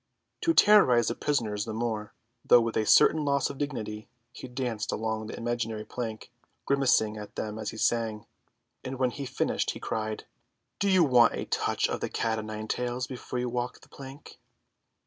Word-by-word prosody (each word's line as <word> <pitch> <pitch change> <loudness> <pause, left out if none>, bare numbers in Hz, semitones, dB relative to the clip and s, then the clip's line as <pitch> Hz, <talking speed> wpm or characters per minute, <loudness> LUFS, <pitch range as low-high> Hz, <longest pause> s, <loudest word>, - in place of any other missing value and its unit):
To 330 -1 +2
terrorise 125 - +6
the - - -1
prisoners 110 -8 -1
the 110 -1 -5
more, 110 -2 -3 0.3
though 120 - +7
with 115 -1 -2
a 110 - 0
certain 155 -1 +5
loss 140 -1 +1
of 140 - -11
dignity, 110 -7 -4 0.2
he 130 - -9
danced 125 -4 -3
along 110 0 -3
an - - -6
imaginary 115 -2 -3
plank, 115 -2 -6 0.3
grimacing 125 -6 +2
at 105 -1 -9
them 110 0 -4
as 110 - -3
he - - -8
sang; 110 -1 0 0.6
and 130 0 -5
when 130 -1 +1
he 140 0 -6
finished - - -1
he - - -4
cried, 110 -1 -3 0.6
"Do 200 - +1
you 185 -2 +5
want 125 -5 +5
a - - -4
touch - - 0
of - - -3
the - - -3
cat 110 -1 -1 0.7
before 125 -1 -6
you 125 0 -1
walk 120 0 -3
the - - -19
plank?" 135 +1 -12
120 Hz, 175 wpm, -28 LUFS, 110-135 Hz, 0.7 s, though